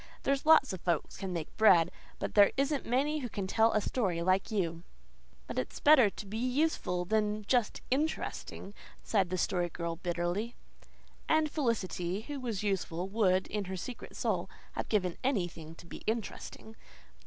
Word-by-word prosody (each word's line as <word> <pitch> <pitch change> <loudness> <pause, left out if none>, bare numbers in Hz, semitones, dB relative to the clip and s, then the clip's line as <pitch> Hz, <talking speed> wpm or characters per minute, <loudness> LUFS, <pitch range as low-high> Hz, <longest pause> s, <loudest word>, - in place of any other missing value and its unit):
There's 275 +2 0
lots 315 -8 +6
of 185 - -6
folks 170 -4 -1
can 190 -1 -4
make 165 -3 -5
bread. 180 -6 +6 0.3
But - - -4
there 205 -1 +7
isn't 275 +1 0
many 285 +5 +1
who 250 -4 -4
can 200 -3 -3
tell 220 +4 +3
a 215 - +2
story 190 -8 -1
like 185 +2 +2
you." 170 -6 -1 0.6
"But - - -3
it's 130 - -4
better 285 -8 +7
to 205 - -9
be 215 +3 -5
useful 250 - 0
than 210 +1 0
just 240 -1 +1
interesting," 275 -7 -2 0.3
sighed 195 -5 +1
the 185 - -1
Story 175 -1 0
Girl 170 0 -4
bitterly. 175 +6 -2 0.7
And 315 -1 +3
Felicity, 200 - -1
who 285 +4 -6
was 230 -6 -3
useful, 185 -3 -1
would, 190 -3 +2
in 210 -1 -3
her 190 0 -5
secret 245 +6 -7
soul, - - -1 0.2
have - - -5
given 185 -5 +1
anything 175 - -2
to 170 - -14
be - - -8
interesting. 220 0 -4
205 Hz, 165 wpm, -31 LUFS, 180-245 Hz, 0.7 s, there